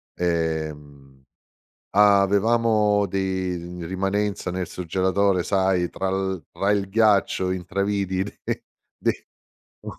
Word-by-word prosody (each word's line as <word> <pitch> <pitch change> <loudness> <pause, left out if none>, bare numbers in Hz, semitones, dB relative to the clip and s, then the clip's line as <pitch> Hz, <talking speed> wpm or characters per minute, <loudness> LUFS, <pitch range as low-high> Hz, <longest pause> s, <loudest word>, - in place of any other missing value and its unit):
Ehm, 75 -5 -3 0.7
avevamo 105 +1 +4
dei 90 -2 -3
rimanenza 95 +2 -1
nel 90 0 -3
surgelatore, 95 +2 0
sai, 95 -2 +1
tra 95 0 -2
l 95 -3 -2
tra 100 - -1
il 100 -2 +1
ghiaccio 100 -3 +2
intravidi 95 +1 -1
de 105 - -6 0.3
de - - -2 0.5
un - - -7
95 Hz, 95 wpm, -24 LUFS, 90-100 Hz, 0.7 s, avevamo